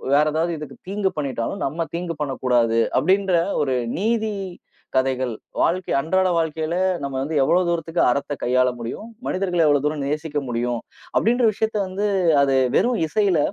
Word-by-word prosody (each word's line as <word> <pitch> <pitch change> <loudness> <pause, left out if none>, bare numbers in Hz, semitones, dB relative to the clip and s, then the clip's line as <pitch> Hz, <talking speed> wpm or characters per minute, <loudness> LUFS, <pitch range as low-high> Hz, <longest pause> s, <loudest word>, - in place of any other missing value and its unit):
வேற 150 - +5
ஏதாவது 165 +2 0
இதுக்கு 150 -1 -9
தீங்கு 200 -1 0
பண்ணிட்டாலும், 140 +6 -3
நம்ம 165 +5 -2
தீங்கு 170 -1 -3
பண்ணக்கூடாது 125 -5 +1 0.2
அப்டின்ற 190 +2 +2 0.3
ஒரு 135 -2 0 0.2
நீதி 220 0 0 0.6
கதைகள் 130 -2 0 0.3
வாழ்க்கை 180 +1 0
அன்றாட 185 +5 +1
வாழ்க்கையில 160 +1 -2 0.3
நம்ம 140 -1 -4
வந்து 155 +3 -3
எவ்ளோ 180 +6 +3
தூரத்துக்கு 170 0 0
அறத்த 145 +2 -2
கையாள 125 +1 +3
முடியும், 165 - -6 0.2
மனிதர்கள 180 -3 +1
எவ்ளோ 145 -2 +3
தூரம் 150 -2 -2
நேசிக்க 150 0 -2
முடியும் 120 0 -1 0.4
அப்டின்ற 240 +2 +2
விஷயத்த 220 +1 -1
வந்து, 200 +3 -2 0.4
அது 135 -1 +2 0.2
வெறும் 240 -4 +1
இசையில 190 -1 +2
160 Hz, 145 wpm, -22 LUFS, 135-190 Hz, 0.6 s, வேற